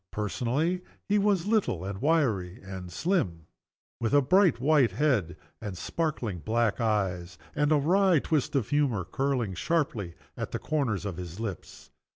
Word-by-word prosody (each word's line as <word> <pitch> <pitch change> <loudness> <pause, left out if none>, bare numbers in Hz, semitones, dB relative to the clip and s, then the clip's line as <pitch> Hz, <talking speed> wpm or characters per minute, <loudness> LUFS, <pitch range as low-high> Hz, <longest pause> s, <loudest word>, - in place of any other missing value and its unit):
Personally, 130 - -1 0.3
he 205 +1 +3
was 200 -4 +2
little 205 - +1
and 100 +1 -5
wiry 120 - +1
and 95 -2 -7
slim 90 - -1 0.5
with 115 +4 +1
a 145 - +6
bright 180 -2 +4
white 135 -5 +3
head, 115 - +1 0.2
and 100 -4 -5
sparkling 120 - -2
black 115 +4 0
eyes, 95 -5 -1 0.2
and 145 0 +1
a 155 - +5
wry 180 +4 +4
twist 150 -1 0
of 130 -6 0
humor 135 - +1
curling 130 -3 -1
sharply 125 - -1 0.2
at - - -5
the - - 0
corners 135 -11 -1
of 95 -4 -4
his 90 +1 -7
lips. 105 -6 -7
120 Hz, 155 wpm, -28 LUFS, 95-155 Hz, 0.5 s, a